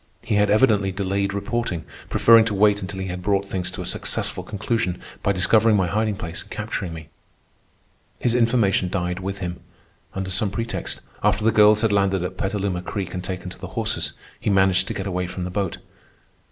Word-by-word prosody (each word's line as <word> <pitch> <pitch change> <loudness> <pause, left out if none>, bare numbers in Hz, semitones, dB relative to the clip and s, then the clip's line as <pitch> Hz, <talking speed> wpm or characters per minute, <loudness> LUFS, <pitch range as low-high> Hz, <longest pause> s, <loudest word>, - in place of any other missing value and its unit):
He - - -2
had 105 0 +3
evidently 105 -3 +4
delayed 100 +1 -1
reporting, 100 -4 -2 0.2
preferring 115 -1 +6
to 105 -2 -1
wait 105 +1 +4
until 95 0 -5
he - - -3
had 90 0 -4
brought 100 +1 +1
things 90 -2 -3
to 90 - -6
a - - -8
successful - - -2
conclusion 105 -3 -2 0.2
by 100 - +2
discovering 105 +4 +4
my 95 -2 +3
hiding 105 +3 0
place 85 -4 -5
and - - -15
capturing 90 - -4
me. 80 -1 -9 1.1
His 120 - +1
information 115 -6 +2
died 90 -1 -2
with 95 +1 -4
him. 90 0 -5 0.6
Under 95 0 -3
some 100 +2 +1
pretext, 115 +3 -4 0.2
after 105 - +2
the 115 - +5
girls 105 -1 +6
had 115 - +2
landed 100 -2 +2
at 90 +1 -4
Petaluma 95 -2 -2
Creek 95 -1 -4
and 90 -1 -4
taken 90 -1 -5
to - - -11
the - - -6
horses, - - 0 0.3
he - - -1
managed 95 -1 +3
to - - -4
get 95 - -3
away 90 -2 -2
from 90 +1 -5
the 90 - -4
boat. 95 -2 -2
100 Hz, 195 wpm, -23 LUFS, 90-105 Hz, 1.1 s, preferring